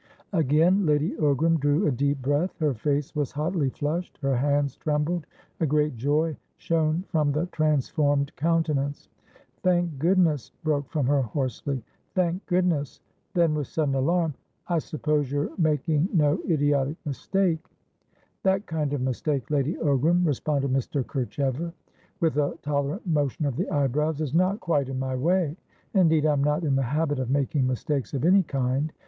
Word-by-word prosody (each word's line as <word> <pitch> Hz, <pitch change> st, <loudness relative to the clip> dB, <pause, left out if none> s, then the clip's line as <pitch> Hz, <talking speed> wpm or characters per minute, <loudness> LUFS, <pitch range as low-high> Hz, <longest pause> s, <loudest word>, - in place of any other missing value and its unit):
Again 165 Hz, +4 st, +3 dB
Lady 150 Hz, +1 st, +2 dB
Ogram 155 Hz, +2 st, +2 dB
drew 145 Hz, +7 st, +2 dB
a -, -, +3 dB
deep 140 Hz, +1 st, 0 dB
breath. 145 Hz, +7 st, 0 dB
Her 150 Hz, -3 st, +1 dB
face 145 Hz, +5 st, -1 dB
was 145 Hz, -3 st, -1 dB
hotly 150 Hz, 0 st, 0 dB
flushed; 155 Hz, +7 st, -3 dB
her 135 Hz, -1 st, +2 dB
hands 140 Hz, +1 st, +1 dB
trembled; 150 Hz, +3 st, -1 dB, 0.3 s
a 160 Hz, -, +1 dB
great 150 Hz, -1 st, +1 dB
joy 150 Hz, +6 st, 0 dB, 0.2 s
shone 160 Hz, +1 st, 0 dB
from 155 Hz, -4 st, +1 dB
the 150 Hz, +4 st, 0 dB
transformed 145 Hz, -1 st, +1 dB
countenance. 150 Hz, -3 st, 0 dB, 0.5 s
"Thank 175 Hz, -5 st, +1 dB
goodness!" 165 Hz, -, +2 dB
broke 145 Hz, -3 st, 0 dB
from 150 Hz, -5 st, 0 dB
her 140 Hz, +1 st, +3 dB
hoarsely. 130 Hz, +1 st, -3 dB, 0.3 s
"Thank 180 Hz, 0 st, 0 dB
goodness!" 175 Hz, -6 st, 0 dB, 0.4 s
Then, 170 Hz, -3 st, +3 dB
with 150 Hz, -3 st, -2 dB
sudden 150 Hz, -4 st, -1 dB
alarm, 160 Hz, +4 st, +1 dB, 0.3 s
"I 170 Hz, -2 st, +1 dB
suppose 150 Hz, -3 st, -1 dB
you're 145 Hz, +1 st, -1 dB
making 155 Hz, +1 st, +1 dB
no 155 Hz, -2 st, +3 dB
idiotic 145 Hz, -1 st, +1 dB
mistake?" 165 Hz, +3 st, 0 dB, 0.8 s
"That 190 Hz, +1 st, +1 dB
kind 150 Hz, -3 st, -2 dB
of 140 Hz, -, -1 dB
mistake, 130 Hz, +1 st, -2 dB
Lady 145 Hz, +3 st, +1 dB
Ogram," 160 Hz, +5 st, +2 dB
responded 140 Hz, -2 st, 0 dB
Mr. 135 Hz, +1 st, 0 dB
Kerchever 140 Hz, +4 st, -2 dB, 0.5 s
with 165 Hz, -5 st, +1 dB
a 145 Hz, -1 st, 0 dB
tolerant 145 Hz, +7 st, -2 dB
motion 150 Hz, -3 st, 0 dB
of 140 Hz, -4 st, -1 dB
the 180 Hz, -, -2 dB
eyebrows, 145 Hz, +2 st, 0 dB
"is 150 Hz, -3 st, -2 dB
not 185 Hz, +6 st, +2 dB
quite 145 Hz, -7 st, 0 dB
in 135 Hz, -, -3 dB
my 130 Hz, 0 st, -2 dB
way. 165 Hz, +3 st, +1 dB, 0.4 s
Indeed, 160 Hz, -5 st, +4 dB
I'm 145 Hz, -2 st, +2 dB
not 150 Hz, +4 st, +1 dB
in 140 Hz, -4 st, +1 dB
the 135 Hz, -, +2 dB
habit 145 Hz, +2 st, 0 dB
of 130 Hz, -2 st, -2 dB
making 140 Hz, 0 st, +1 dB
mistakes 135 Hz, +2 st, -2 dB
of 135 Hz, -, -1 dB
any 190 Hz, +3 st, +6 dB
kind. 135 Hz, -1 st, -1 dB
150 Hz, 155 wpm, -26 LUFS, 140-165 Hz, 0.8 s, any